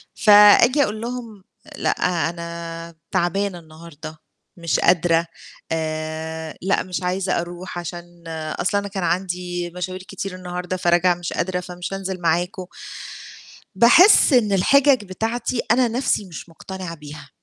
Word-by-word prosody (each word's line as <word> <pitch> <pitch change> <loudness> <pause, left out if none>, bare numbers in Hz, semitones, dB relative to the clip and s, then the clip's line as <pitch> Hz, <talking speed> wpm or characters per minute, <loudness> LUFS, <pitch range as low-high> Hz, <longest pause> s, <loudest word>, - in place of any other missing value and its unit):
فآجي 210 +7 +7
أقول 215 -2 -3
لهم: 230 -4 -6 0.3
"لأ، - - +1 0.4
أنا 170 0 -7 0.2
تعبانة 185 +1 0
النهارده، 160 -1 -11 0.4
مش 170 -2 0
قادرة 170 -1 +3 0.5
آآ، 160 0 -4
لأ 190 +2 +1
مش 185 0 -5
عايزة 180 +1 0
أروح 175 +1 -8
عشان 175 0 -9 0.4
أصل 205 - +1
أنا 200 0 -2
كان 195 -2 -4
عندي 175 -1 -2
مشاوير 185 +1 -5
كتير 195 0 -6
النهارده 180 0 -5
فراجعة 175 0 +3
مش 175 -2 -5
قادرة 180 +1 -1
فمش 180 +1 -7
هانزل 190 -1 -4
معاكم." 175 +3 0 1.1
باحس 310 - +7
إن 220 -5 +4
الحجج 265 +6 +4
بتاعتي 225 +5 -3
أنا 245 +1 +4
نَفْسي 235 -3 0
مش 175 -2 -10
مقتنعة 180 +1 -8
بيها. 150 -1 -11
180 Hz, 125 wpm, -21 LUFS, 170-200 Hz, 1.1 s, فآجي